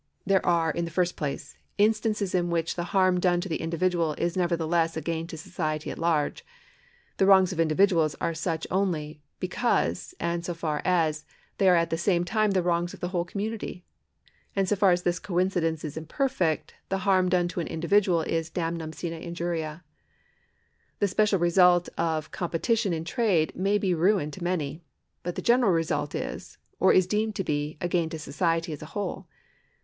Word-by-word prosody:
There 195 -1 +3
are, 165 -2 +2
in 170 +2 -2
the - - -5
first 180 +2 0
place, 140 -2 -5 0.2
instances 210 -1 +1
in 175 -1 +1
which 165 -1 0
the 175 - -3
harm 185 0 +2
done 175 -1 +2
to 195 - -4
the 165 - -3
individual 165 -1 0
is 170 +3 -2
nevertheless 170 -2 +1
a - - 0
gain 165 0 -3
to 165 - -8
society 155 -2 -3
at - - -8
large. 160 -3 0 0.7
The 195 - +3
wrongs 190 -1 +6
of 170 - -7
individuals 165 -1 +3
are 165 - -1
such 165 -1 -2
only 160 -6 -1 0.2
because, 240 - -1
and 170 0 -1
only - - -9
so 175 0 -4
far 155 -3 -2
as, 160 -4 +1 0.4
thejT^ 195 - +4
are 180 - +7
at 170 0 +1
the 165 - -1
same 175 -1 +2
time 215 +3 +1
the 190 -2 +1
wrongs 175 0 0
of - - -17
the 175 - -3
whole 175 -2 0
com 200 +3 -4
munity; 220 -4 -5 0.7
and 195 -1 +1
so 210 - +2
far 200 -1 +4
as 175 0 +2
this 175 0 0
coincidence 175 -4 0
is 150 - -6
imperfect, 165 - -1 0.2
the 195 0 -2
harm 185 -2 +3
done 180 -1 +2
to 175 - -4
an 170 - -2
individual 170 +1 +2
is 165 +1 -2
damnum 165 -1 -3
sine 170 -2 -4
injuria. 170 -1 -4 1.1
The 205 - +2
special 205 +1 +2
result 175 0 +4
of 160 -2 -1
competition 195 +5 0
in 165 -1 -2
trade 185 -7 +1
may 195 +3 +1
be 190 -3 0
ruin 175 -2 +2
to 170 +5 -8
many; 160 -3 -2 0.4
but 175 0 -4
the - - -4
general 240 -3 +4
result 160 -3 -1
is, - - -5 0.2
or - - +5
is 185 - +5
deemed 215 +3 -1
to 195 - -1
be, 150 -1 -2
a 175 - -1
gain 170 -2 0
to 160 - -5
society 165 +2 -1
as 145 - -8
a 155 - -8
whole. 190 -2 -4
175 Hz, 195 wpm, -27 LUFS, 165-190 Hz, 1.1 s, are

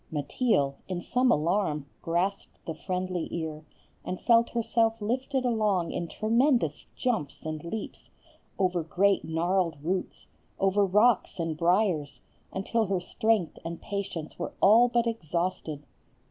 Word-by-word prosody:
Mateel, 145 - +1
in 185 -2 -3
some 250 +7 +2
alarm, 155 -3 +1 0.2
grasped 180 +4 -2
the 165 - -3
friendly 185 -1 -3
ear, 155 -2 -5 0.4
and 185 - -4
felt 235 -1 +4
herself 230 -1 +1
lifted 255 +4 -1
along 210 -7 +1
in 170 - -3
tremendous 230 - +1
jumps 225 - -1
and 155 -1 -4
leaps, 210 +6 -6 0.5
over 180 -2 +1
great 195 +5 +2
gnarled 170 0 0
roots, 180 +3 -3 0.3
over 195 +1 +3
rocks 210 +3 +3
and 165 -1 -1
briers, 170 -3 +1 0.3
until 220 +3 0
her 190 -1 0
strength 210 0 0
and 165 0 -5
patience 195 -6 -5
were - - -4
all 225 +5 +7
but 240 0 +2
exhausted. 170 -7 -2
185 Hz, 130 wpm, -28 LUFS, 165-225 Hz, 0.5 s, all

